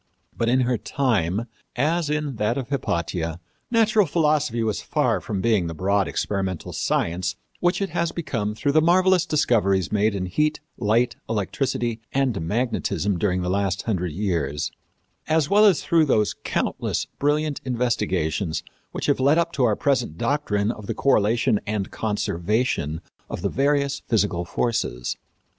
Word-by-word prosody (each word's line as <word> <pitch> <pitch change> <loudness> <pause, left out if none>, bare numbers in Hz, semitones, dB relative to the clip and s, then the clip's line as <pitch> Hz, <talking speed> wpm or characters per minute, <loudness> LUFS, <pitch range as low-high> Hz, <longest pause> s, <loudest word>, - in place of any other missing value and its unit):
But 115 - 0
in 130 +2 +3
her 125 -2 +1
time, 110 - 0 0.3
as 155 +4 +1
in 150 -4 -2
that 105 +4 0
of 130 -2 -4
Hypatia, 85 - -2 0.3
natural 220 -4 +3
philosophy 150 -7 +1
was 110 -2 -1
far - - 0
from 100 -3 -3
being 105 -5 +2
the 80 - -5
broad 100 +3 +1
experimental 95 -4 -2
science 90 +2 -1 0.2
which 175 +3 +1
it 195 - -4
has 170 -1 0
become 110 -10 -3
through 140 +5 0
the 155 +2 +4
marvelous 185 +2 +4
discoveries 105 - +2
made 105 0 +2
in 95 -2 -2
heat, 150 - 0 0.2
light, 115 +3 +1
electricity 115 +2 -1
and 130 -8 +1
magnetism 105 -1 -1
during 90 -1 0
the - - -2
last 95 0 0
hundred 90 -6 -1
years, 80 -6 -1 0.6
as 155 0 +1
well 210 +2 +6
as 195 -6 +4
through 165 -2 +3
those 105 -7 +2
countless - - -1
brilliant 150 0 0
investigations 100 - -1 0.3
which - - -3
have 145 - +2
led 140 +4 +4
up 170 0 +1
to 130 - +2
our 110 -3 +3
present 125 - 0
doctrine 110 -7 0
of 105 -4 -9
the - - -2
correlation 115 -2 +2
and 105 -2 -2
conservation 105 - -1 0.3
of - - -5
the 100 - +1
various 140 +2 +1
physical 100 -6 +1
forces. 85 - -1
115 Hz, 150 wpm, -24 LUFS, 95-145 Hz, 0.6 s, well